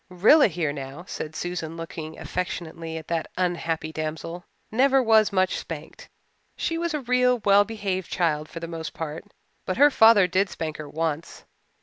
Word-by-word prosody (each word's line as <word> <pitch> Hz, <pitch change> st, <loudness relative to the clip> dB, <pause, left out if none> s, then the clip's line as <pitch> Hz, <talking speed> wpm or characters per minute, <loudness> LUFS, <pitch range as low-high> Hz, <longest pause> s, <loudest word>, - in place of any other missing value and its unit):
"Rilla 215 Hz, -, +6 dB
here, 160 Hz, -5 st, -2 dB
now," 140 Hz, +3 st, -7 dB
said 155 Hz, 0 st, -6 dB
Susan, 170 Hz, -2 st, -4 dB
looking 160 Hz, -1 st, -7 dB
affectionately 165 Hz, -2 st, -4 dB
at 160 Hz, -, -9 dB
that 165 Hz, -2 st, -1 dB
unhappy 170 Hz, -3 st, -1 dB
damsel, 160 Hz, +2 st, -5 dB, 0.3 s
"never 270 Hz, +4 st, +4 dB
was 220 Hz, -4 st, +4 dB
much 185 Hz, -1 st, +1 dB
spanked. -, -, -9 dB, 0.5 s
She 330 Hz, -, -1 dB
was 335 Hz, -1 st, -1 dB
a 300 Hz, -, -2 dB
real 250 Hz, 0 st, +3 dB
well 200 Hz, 0 st, +6 dB
behaved 200 Hz, -4 st, -3 dB
child 155 Hz, -3 st, 0 dB
for 165 Hz, -, -7 dB
the 165 Hz, -, -6 dB
most 165 Hz, -1 st, -6 dB
part. 160 Hz, +2 st, -5 dB, 0.4 s
But 185 Hz, -, -3 dB
her 290 Hz, +2 st, +7 dB
father 220 Hz, -5 st, +7 dB
did 190 Hz, +2 st, +1 dB
spank 160 Hz, -2 st, -5 dB
her 150 Hz, -1 st, -8 dB
once. 160 Hz, 0 st, -3 dB
175 Hz, 170 wpm, -25 LUFS, 160-215 Hz, 0.5 s, her